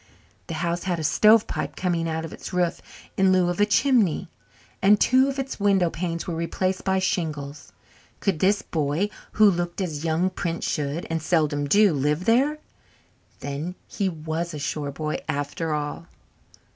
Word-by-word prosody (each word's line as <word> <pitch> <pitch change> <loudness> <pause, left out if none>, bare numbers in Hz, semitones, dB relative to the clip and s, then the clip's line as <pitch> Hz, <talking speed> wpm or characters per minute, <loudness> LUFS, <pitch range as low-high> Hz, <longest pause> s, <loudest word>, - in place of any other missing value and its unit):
The 165 - -4
house 170 +2 -2
had 180 -2 0
a 160 - -4
stovepipe 215 +7 +3
coming 170 -3 -1
out 160 0 -2
of 160 - -8
its - - -8
roof 180 -2 0 0.4
in 190 -1 +4
lieu 185 -1 +3
of 175 +3 -1
a 205 - +4
chimney, 210 - +2 0.5
and 205 +2 +5
two 260 +2 +4
of 275 - -4
its 270 -3 -4
window 195 -4 +3
panes 170 0 -3
were 175 - -3
replaced 185 +3 -2
by 190 0 +1
shingles. 155 -6 -3 0.5
Could 190 -6 0
this 200 +3 +2
boy, 160 +6 -1 0.2
who 215 -1 +6
looked 175 0 -3
as 160 -6 -3
young 165 +3 +1
princes 170 -2 -3
should 150 +3 -3
and 165 0 -1
seldom 150 -3 +1
do 205 +2 +5
live 150 +5 0
there? 270 +7 +3 0.8
Then 145 +6 -4
he 195 -2 -1
was 160 0 -4
a - - -4
shore 145 0 -3
boy 155 +2 -3
after 145 +3 -2
all. 150 +2 -3
170 Hz, 170 wpm, -24 LUFS, 155-190 Hz, 0.8 s, who